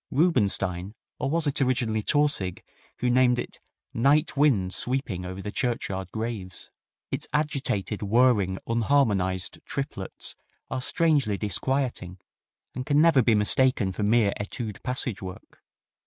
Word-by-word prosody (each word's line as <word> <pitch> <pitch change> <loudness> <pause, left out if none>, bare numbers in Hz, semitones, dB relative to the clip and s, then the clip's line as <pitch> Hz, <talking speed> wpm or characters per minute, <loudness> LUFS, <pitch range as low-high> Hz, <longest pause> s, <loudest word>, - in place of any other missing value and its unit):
Rubinstein, 100 - +1 0.2
or 135 - -1
was 165 +2 0
it 145 -1 -1
originally 120 -4 +1
Tausig 145 - +1 0.4
who 125 0 +2
named 125 0 +4
it 120 - -5 0.3
"Night 145 +7 +2
winds 120 -11 +2
sweeping 120 -8 -2
over 95 +1 -6
the 105 - -4
churchyard 95 -6 -2
graves"? 110 -5 -5 0.4
Its - - -2
agitated, 140 - -1
whirring, 105 -3 +3
unharmonized 105 -7 +1
triplets 135 -9 -5 0.4
are 130 - -2
strangely 145 - +2
disquieting, 110 -3 -2 0.6
and 130 - -4
can 145 +2 +2
never 160 -4 +5
be 115 -1 +3
mistaken 105 -1 +3
for 95 - -5
mere 105 -1 +3
etude 105 +1 -5
passage 125 -4 -1
work. 95 -1 -10
120 Hz, 125 wpm, -26 LUFS, 100-135 Hz, 0.6 s, never